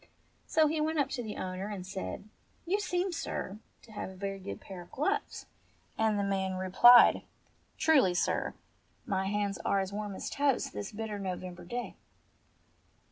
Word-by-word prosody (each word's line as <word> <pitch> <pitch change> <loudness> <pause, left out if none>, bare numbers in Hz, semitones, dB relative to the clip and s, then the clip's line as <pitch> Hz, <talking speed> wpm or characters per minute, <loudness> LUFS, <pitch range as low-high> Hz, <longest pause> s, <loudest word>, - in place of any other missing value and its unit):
So 315 -1 +4
he 305 +1 +1
went 315 +1 0
up 280 -2 +2
to 250 - -3
the 215 -3 -6
owner 185 +1 -4
and 200 -3 -5
said, 95 - -5 0.4
"You 385 +4 +1
seem, 365 -2 -1
sir, 215 - -4 0.2
to 225 - -16
have 210 - -5
a 190 - -11
very 195 +1 -4
good 195 +1 -6
pair 190 -2 -9
of 175 - -14
gloves." 405 +9 -1 0.5
And 220 -1 +2
the 200 - +1
man 190 -1 -1
replied, 190 +7 +7 0.6
"Truly, 270 - +4
sir, - - 0 0.5
my 190 -1 -1
hands 205 0 -1
are 200 - +2
as 190 0 -3
warm 205 -1 -4
as - - -5
toast 280 -3 +1
this 105 0 -5
bitter 215 -1 -4
November 185 -2 -5
day." 240 +6 -5
205 Hz, 170 wpm, -31 LUFS, 190-260 Hz, 0.6 s, replied